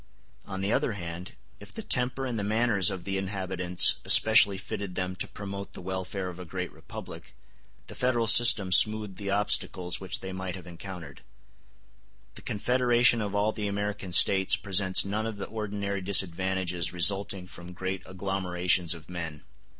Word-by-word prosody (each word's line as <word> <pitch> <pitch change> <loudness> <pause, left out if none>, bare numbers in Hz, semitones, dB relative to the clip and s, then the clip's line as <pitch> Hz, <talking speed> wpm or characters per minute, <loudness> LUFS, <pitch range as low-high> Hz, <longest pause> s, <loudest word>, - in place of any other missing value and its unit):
On 95 -1 -7
the 100 +3 -1
other 115 - -1
hand, 85 -1 -8 0.3
if 105 - -14
the 225 - -7
temper 130 -6 -2
and 120 -4 -4
the - - -4
manners 105 -2 +2
of 95 -3 -6
the 95 +1 -4
inhabitants 95 -2 +2
especially 110 -3 +6
fitted 95 0 -7
them 90 0 -4
to - - -3
promote 100 -1 -9
the - - -8
welfare 95 +1 -6
of 90 -1 -9
a - - -8
great 90 +1 -7
republic, - - -12 0.5
the - - -12
Federal 120 -2 -1
system 110 -4 +6
smoothed 105 +1 +3
the 100 -2 -6
obstacles 95 -3 -1
which 95 -2 -4
they 95 0 -8
might 95 -1 -6
have 90 - -12
encountered. 90 0 -11 1.1
The - - -11
confederation 120 +1 +1
of 100 -1 -5
all 105 +1 0
the 105 -1 -5
American 100 -1 -5
States 95 +1 +6
presents 95 -1 +3
none 105 +3 -4
of 110 -2 -7
the 100 - -6
ordinary 100 -2 -5
disadvantages 95 -2 +1
resulting 95 +2 +1
from 90 -1 -13
great 95 +1 -5
agglomerations 90 -2 -1
of 80 - -15
men. 85 -4 -8
95 Hz, 165 wpm, -26 LUFS, 90-105 Hz, 1.1 s, especially